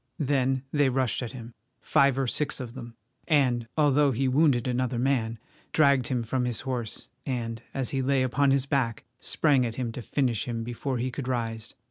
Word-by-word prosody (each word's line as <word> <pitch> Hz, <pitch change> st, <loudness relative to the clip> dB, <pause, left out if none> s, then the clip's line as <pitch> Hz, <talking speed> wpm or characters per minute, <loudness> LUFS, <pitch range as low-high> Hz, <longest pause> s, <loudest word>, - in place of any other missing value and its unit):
Then 135 Hz, -2 st, +1 dB
they 145 Hz, -3 st, +3 dB
rushed 130 Hz, -1 st, 0 dB
at 125 Hz, 0 st, -5 dB
him, 120 Hz, -2 st, -9 dB, 0.3 s
five 140 Hz, -1 st, +3 dB
or 135 Hz, -, +1 dB
six 140 Hz, +4 st, -1 dB
of 120 Hz, -3 st, -6 dB
them, 120 Hz, -3 st, -9 dB, 0.3 s
and, 125 Hz, -7 st, +2 dB
although 145 Hz, -1 st, +4 dB
he 130 Hz, +1 st, 0 dB
wounded 130 Hz, -2 st, +3 dB
another 125 Hz, 0 st, 0 dB
man, 120 Hz, -3 st, 0 dB, 0.4 s
dragged 140 Hz, -5 st, +4 dB
him 125 Hz, -3 st, -1 dB
from 125 Hz, +2 st, -1 dB
his 120 Hz, -2 st, -2 dB
horse, 125 Hz, -4 st, -4 dB, 0.2 s
and, 115 Hz, -4 st, -3 dB
as 135 Hz, -2 st, -2 dB
he 135 Hz, -, 0 dB
lay 130 Hz, 0 st, +2 dB
upon 135 Hz, +2 st, +2 dB
his 135 Hz, -1 st, +2 dB
back, 130 Hz, -5 st, -1 dB, 0.2 s
sprang 140 Hz, -5 st, +2 dB
at 115 Hz, -2 st, -3 dB
him 120 Hz, -2 st, -3 dB
to 125 Hz, -, -6 dB
finish 120 Hz, -2 st, 0 dB
him 115 Hz, -1 st, -3 dB
before 125 Hz, +3 st, -3 dB
he 125 Hz, +2 st, -2 dB
could 125 Hz, 0 st, -5 dB
rise. 115 Hz, -3 st, -3 dB
130 Hz, 190 wpm, -27 LUFS, 120-135 Hz, 0.4 s, although